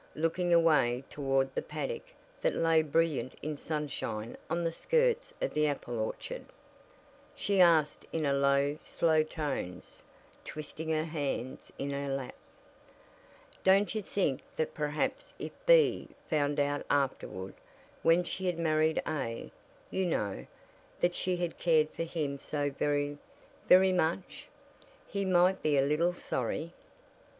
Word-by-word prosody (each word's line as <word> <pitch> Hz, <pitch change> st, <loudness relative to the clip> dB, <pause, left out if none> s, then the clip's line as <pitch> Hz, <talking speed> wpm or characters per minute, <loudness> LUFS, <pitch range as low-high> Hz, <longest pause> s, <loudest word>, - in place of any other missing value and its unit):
Looking 165 Hz, +3 st, 0 dB
away 150 Hz, -7 st, +4 dB
toward 135 Hz, -2 st, 0 dB
the -, -, -1 dB
paddock 485 Hz, 0 st, -5 dB, 0.3 s
that -, -, +1 dB
lay 165 Hz, -1 st, +4 dB
brilliant 155 Hz, -5 st, 0 dB
in 155 Hz, +1 st, -2 dB
sunshine 140 Hz, -8 st, -4 dB
on 170 Hz, +1 st, 0 dB
the 165 Hz, -, 0 dB
skirts 485 Hz, -, +1 dB
of -, -, -2 dB
the 150 Hz, 0 st, +2 dB
apple 120 Hz, -5 st, -3 dB
orchard, -, -, -4 dB, 0.9 s
she 200 Hz, -2 st, +2 dB
asked 160 Hz, -4 st, +4 dB
in 160 Hz, -, -1 dB, 0.2 s
low 140 Hz, +2 st, +2 dB
slow 160 Hz, -2 st, +2 dB
tones, 150 Hz, -, -5 dB, 0.4 s
twisting 155 Hz, +1 st, -6 dB
her 155 Hz, 0 st, +1 dB
hands 145 Hz, -6 st, -4 dB
in 140 Hz, +1 st, -3 dB
her 140 Hz, 0 st, -3 dB
lap: 135 Hz, -2 st, -3 dB, 1.3 s
"Don't 195 Hz, +2 st, +4 dB
you 215 Hz, -, -1 dB
think 185 Hz, -9 st, -1 dB
that 155 Hz, -, -1 dB
perhaps 155 Hz, -, -2 dB
if -, -, -5 dB, 0.2 s
B -, -, +5 dB, 0.2 s
found 145 Hz, -2 st, +1 dB
out 145 Hz, 0 st, 0 dB
afterward 95 Hz, -9 st, -1 dB, 0.5 s
when 170 Hz, +2 st, +4 dB
she 190 Hz, +1 st, -4 dB
had 175 Hz, -2 st, 0 dB
married 155 Hz, -1 st, +2 dB
A, 115 Hz, -7 st, -3 dB, 0.4 s
you 190 Hz, -1 st, 0 dB
know 105 Hz, -, -2 dB, 0.5 s
that 175 Hz, 0 st, +2 dB
she 180 Hz, 0 st, -1 dB
had 175 Hz, -2 st, -3 dB
cared 155 Hz, -3 st, +3 dB
for 165 Hz, -, -3 dB
him 150 Hz, -4 st, -3 dB
so 145 Hz, 0 st, -2 dB
very, 145 Hz, +1 st, -1 dB, 0.5 s
very 185 Hz, +1 st, +7 dB
much, 175 Hz, 0 st, -1 dB, 0.6 s
he 200 Hz, -1 st, -2 dB
might 185 Hz, +1 st, +4 dB
be 150 Hz, -2 st, +2 dB
a 135 Hz, -, +5 dB
little 155 Hz, +5 st, +2 dB
sorry?" 155 Hz, +4 st, -3 dB
155 Hz, 135 wpm, -31 LUFS, 140-175 Hz, 1.3 s, very